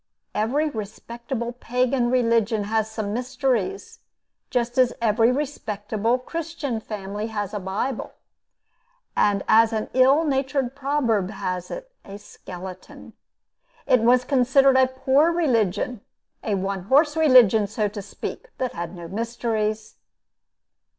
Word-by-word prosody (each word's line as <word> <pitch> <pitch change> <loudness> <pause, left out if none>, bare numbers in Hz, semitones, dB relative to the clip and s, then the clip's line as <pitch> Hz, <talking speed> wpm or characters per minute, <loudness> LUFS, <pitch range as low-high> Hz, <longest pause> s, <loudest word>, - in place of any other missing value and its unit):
Every 255 +9 0
respectable 235 +1 -5
Pagan 250 +1 0
religion 230 -3 +2
had 220 +1 0
some 220 -2 -4
mysteries, 265 - -2 0.5
just 245 0 -1
as 250 -1 +4
every 225 +1 +3
respectable 225 -5 -2
Christian 300 -3 -4
family 210 0 -5
has 205 -3 -4
a 210 - -2
bible 200 +7 -3 1.0
and, 200 -1 +2
as 225 +1 +5
an 215 -1 -3
ill 265 +5 +5
natured 270 -3 -1
proverb 260 -9 0
has 185 -3 -4
it, - - -7
a 200 0 -9
skeleton. 185 -2 -11 0.7
It 255 - +4
was 245 +2 +4
considered 270 0 +4
a 260 0 +5
poor 265 +5 +2
religion 235 - 0 0.4
a 210 - 0
one 195 -1 -3
horse 295 +6 +3
religion, 250 -9 +5
so 210 +1 -1
to 205 0 -7
speak 210 - -7
that 255 -1 -2
had 170 +2 -6
no 170 -1 -8
mysteries. 220 +1 -3
235 Hz, 125 wpm, -23 LUFS, 210-265 Hz, 1.0 s, as